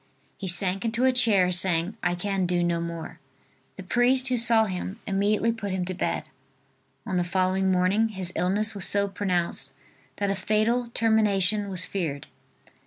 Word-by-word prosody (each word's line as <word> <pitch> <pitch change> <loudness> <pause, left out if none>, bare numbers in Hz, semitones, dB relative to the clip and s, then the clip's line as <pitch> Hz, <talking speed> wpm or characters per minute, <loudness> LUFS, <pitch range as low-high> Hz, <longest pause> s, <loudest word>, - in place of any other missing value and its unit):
He 195 - -7
sank 185 +2 +4
into 235 +2 0
a 260 - +5
chair 210 -8 +3
saying: 180 +1 +2
"I 180 0 0
can 190 0 -2
do 175 0 0
no 170 -1 0
more." 165 -1 -7 0.6
The 190 - -8
priest 250 +7 +2
who 250 - +1
saw 230 -1 +3
him, 190 +2 -5
immediately 205 +3 +1
put 220 -3 -5
him 185 -1 -2
to 185 - -4
bed. 180 - -2 0.8
On 190 -5 -2
the 175 - +1
following 185 +1 0
morning 185 +5 +2
his 190 -3 -5
illness 205 +5 0
was 200 -4 -1
so 200 0 +1
pronounced 185 -3 -1 0.4
that 200 -1 -1
a - - -1
fatal 225 +4 0
termination 210 -2 +2
was 185 -2 -4
feared. 155 -8 -4
195 Hz, 170 wpm, -25 LUFS, 180-215 Hz, 0.8 s, a